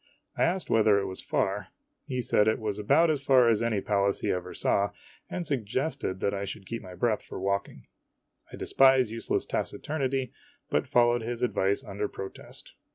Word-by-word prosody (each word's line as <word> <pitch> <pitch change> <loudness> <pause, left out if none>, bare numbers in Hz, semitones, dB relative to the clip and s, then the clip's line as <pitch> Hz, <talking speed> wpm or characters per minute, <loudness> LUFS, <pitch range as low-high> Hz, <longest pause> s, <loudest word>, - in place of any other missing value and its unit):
I - - -3
asked 180 +2 -1
whether 110 -2 +5
it 100 - 0
was 95 -1 -5
far. 100 +2 -1 0.4
He 130 -3 -2
said 105 -1 +3
it 110 - +3
was 105 -2 -3
about 150 +10 +4
as 145 -3 -1
far 130 -3 +5
as 110 -1 +2
any 115 -4 0
place 100 -1 +1
he - - 0
ever 90 0 -3
saw, 100 0 +1 0.4
and 180 -1 -3
suggested 130 -6 -2
that 100 - +1
I 100 0 -3
should 100 0 -7
keep 115 +4 -5
my 90 -1 -10
breath 110 +3 +1
for - - -8
walking. 100 +1 -2 0.7
I - - -7
despise 130 -4 +4
useless 115 0 -1
taciturnity, 135 -4 -2 0.4
but - - +1
fol 120 -1 +4
lowed 120 0 +1
his 120 +1 -4
advice 100 -5 +1
under 100 +1 -3
protest. 95 -1 -9
110 Hz, 185 wpm, -28 LUFS, 100-130 Hz, 0.7 s, whether